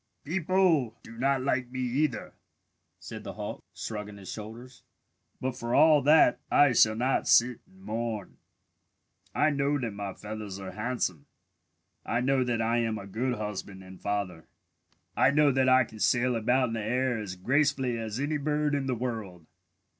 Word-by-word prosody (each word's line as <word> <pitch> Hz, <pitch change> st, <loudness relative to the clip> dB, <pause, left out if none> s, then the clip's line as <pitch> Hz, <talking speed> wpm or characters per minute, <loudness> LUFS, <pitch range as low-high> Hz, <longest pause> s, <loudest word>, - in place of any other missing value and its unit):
"People 170 Hz, -, +1 dB
do 115 Hz, -, -12 dB
not 135 Hz, +2 st, +1 dB
like 125 Hz, -2 st, 0 dB
me 130 Hz, +1 st, -4 dB
either," 130 Hz, +5 st, -1 dB, 0.7 s
said -, -, -9 dB
the -, -, -6 dB
hawk, -, -, -6 dB
shrugging 105 Hz, -1 st, -6 dB
his 95 Hz, -2 st, -9 dB
shoulders. 115 Hz, +4 st, -9 dB, 0.6 s
"But 130 Hz, -1 st, -3 dB
for 120 Hz, -1 st, -2 dB
all 155 Hz, 0 st, +6 dB
that 150 Hz, +3 st, +5 dB
I 145 Hz, -3 st, +5 dB
shall 110 Hz, -2 st, +5 dB
not 125 Hz, +4 st, 0 dB
sit 120 Hz, 0 st, +4 dB
and 190 Hz, 0 st, -21 dB
mourn. 115 Hz, -, -4 dB, 1.0 s
"I 155 Hz, -, +3 dB
know 145 Hz, 0 st, +1 dB
that 120 Hz, -6 st, -3 dB
my 100 Hz, -1 st, -5 dB
feathers 105 Hz, -2 st, -7 dB
are 95 Hz, -1 st, -7 dB
handsome. 105 Hz, -, -3 dB, 0.8 s
I 115 Hz, -, -1 dB
know 130 Hz, +1 st, +2 dB
that 120 Hz, -2 st, -1 dB
I 115 Hz, +1 st, +1 dB
am 115 Hz, -2 st, -1 dB
a 100 Hz, -, -8 dB
good 120 Hz, +5 st, -2 dB
husband 100 Hz, -2 st, -6 dB
and 95 Hz, 0 st, -13 dB
father. 100 Hz, -5 st, -3 dB, 0.7 s
I -, -, +4 dB
know 145 Hz, 0 st, +4 dB
that 130 Hz, 0 st, +2 dB
I 130 Hz, 0 st, +6 dB
can 110 Hz, -1 st, -12 dB
sail 125 Hz, +2 st, +2 dB
about 125 Hz, +3 st, +2 dB
in -, -, -4 dB
the 110 Hz, -2 st, -3 dB
air 125 Hz, +2 st, 0 dB
as 100 Hz, -3 st, -6 dB
gracefully 130 Hz, +3 st, +1 dB
as 110 Hz, +1 st, -4 dB
any 150 Hz, +2 st, -1 dB
bird 150 Hz, 0 st, 0 dB
in 140 Hz, -2 st, -1 dB
the 130 Hz, -, 0 dB
world. 110 Hz, -8 st, -5 dB
120 Hz, 170 wpm, -28 LUFS, 110-135 Hz, 1.0 s, all